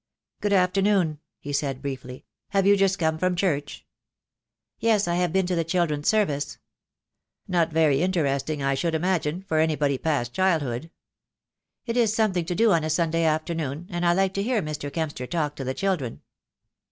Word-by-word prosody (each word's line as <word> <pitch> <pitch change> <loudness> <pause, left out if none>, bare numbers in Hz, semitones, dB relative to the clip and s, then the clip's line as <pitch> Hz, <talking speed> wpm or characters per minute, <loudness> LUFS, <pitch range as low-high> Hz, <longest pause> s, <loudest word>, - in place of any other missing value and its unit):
"Good 205 - -1
afternoon," 185 -4 +2 0.2
he 145 - -6
said 140 -2 -1
briefly. 130 -2 -6 0.2
"Have 195 -1 +1
you 200 +1 +6
just 195 -1 +2
come 160 -1 0
from 185 +1 +1
church?" 150 -6 -2 0.9
"Yes, 215 -4 +2
I 170 - 0
have 180 -2 +1
been 190 +1 +2
to 180 - -1
the 165 - +1
children's 165 -3 0
service." 150 -10 +1 0.9
"Not 170 -3 +2
very 155 -3 +3
interesting, 150 -5 0
I 135 0 +2
should 160 +4 -1
imagine, 175 0 -1
for 160 -5 0
anybody 150 -4 +1
past 140 -7 -1
childhood?" 160 -7 0 1.0
"It 230 0 -2
is 225 -3 +3
something 195 -6 +1
to 175 +1 -2
do 225 +1 +4
on 165 -3 +3
a 155 - -2
Sunday 165 +1 +1
afternoon, 155 -1 -1
and 175 0 -2
I 175 0 +4
like 190 +1 +1
to 195 - -1
hear 235 +2 +1
Mr. 150 -2 -5
Kempster 150 -6 -3
talk 150 -2 -2
to 135 - -4
the 130 0 -3
children." 180 -12 -2
165 Hz, 175 wpm, -25 LUFS, 145-190 Hz, 1.0 s, you